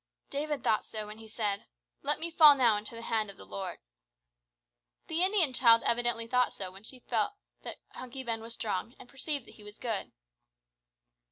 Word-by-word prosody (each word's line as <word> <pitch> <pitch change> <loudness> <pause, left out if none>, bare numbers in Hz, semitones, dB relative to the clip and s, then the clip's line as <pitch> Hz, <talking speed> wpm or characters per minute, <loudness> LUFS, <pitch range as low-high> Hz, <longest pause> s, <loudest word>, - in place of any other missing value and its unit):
David 295 +1 -2
thought 215 - +2
so 215 -1 -5
when 210 +1 -10
he 225 - -11
said, 210 -2 -2 0.3
"Let - - 0
me 335 +1 -2
fall 305 -3 +9
now 240 -5 +4
into 210 +2 -6
the 230 - -7
hand 220 -3 0
of 200 - -10
the - - -12
Lord." 100 0 -5 1.3
The 325 +2 -1
Indian 370 -7 +3
child 230 -2 +6
evidently 235 -1 +2
thought 250 +1 +2
so 190 -2 -4
when 190 +1 -13
she 250 +4 -7
felt 230 - +1 0.3
that - - -6
Hunky 255 +1 -7
Ben 230 -2 -2
was 230 +1 -4
strong 220 +2 -3
and - - -13
perceived 275 0 -4
that - - -14
he 210 - -13
was 210 +1 -10
good. 225 -5 -2
230 Hz, 190 wpm, -31 LUFS, 215-265 Hz, 1.3 s, fall